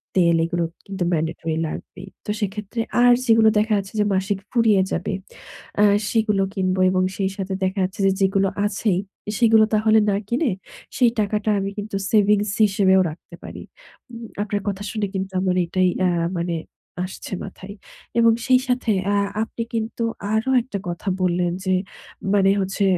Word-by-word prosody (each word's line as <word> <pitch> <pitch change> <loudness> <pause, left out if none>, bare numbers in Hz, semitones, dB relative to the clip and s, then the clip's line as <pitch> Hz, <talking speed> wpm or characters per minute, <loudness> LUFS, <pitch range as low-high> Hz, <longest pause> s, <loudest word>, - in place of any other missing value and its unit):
তেল 170 -3 +4
এগুলো 175 0 -1 0.2
কিন্তু 195 -2 -3
mandatory 160 0 -2
লাগবেই। 185 +4 -8 0.2
তো - - -8
সেক্ষেত্রে 210 +2 -4 0.2
আর 245 0 +7
যেগুলো 225 -2 +5
দেখা 215 +1 +1
যাচ্ছে 195 0 -5
যে 210 - +3
মাসিক 190 +1 0
ফুরিয়ে 220 -5 +4
যাবে, 180 +3 -2 0.7
আ - - +6 0.3
সেগুলো 215 -3 +1
কিনব 185 -2 0
এবং 185 0 +1
সেই 195 -1 0
সাথে 195 0 -3
দেখা 190 +1 -1
যাচ্ছে 185 +2 -4
যে 195 - +4
যেগুলো 195 0 +3 0.2
আছেই, 200 -2 0 0.3
এ - - 0
সেগুলো 225 -2 +6
তাহলে 220 +1 +4
না 200 - +2
কিনে 245 +3 +1 0.5
সেই 245 -2 +5
টাকাটা 210 +1 0
আমি 195 0 -2
কিন্তু 205 0 -5 0.2
সেভিংস 210 -1 +3 0.2
হিসেবেও 190 -1 +3
রাখতে 170 +2 -12
পারি। - - -8 0.5
উম 235 0 -8 0.2
আপনার 205 -1 -2
কথা 200 0 -2
শুনে 215 -1 -1
কিন্তু 190 0 -3
আমার 185 -1 +1
এটাই 185 +2 +1
অ্যা 185 -1 +3 0.3
মানে 170 0 -1 0.5
আসছে 185 +1 -7
মাথায়। 195 +1 -9 0.5
এবং 230 0 +6
সেই 255 -2 +5
সাথে 250 -3 0 0.2
আ - - +2 0.3
আপনি 230 +1 -5
কিন্তু 225 +1 -2 0.3
আরও 220 +4 +1
একটা 230 -4 -5
কথা 175 +3 -6
বললেন 175 -1 +1
যে 185 - +2 0.6
মানে 195 -1 +4
হচ্ছে 195 +1 -1
200 Hz, 165 wpm, -22 LUFS, 185-220 Hz, 0.7 s, আর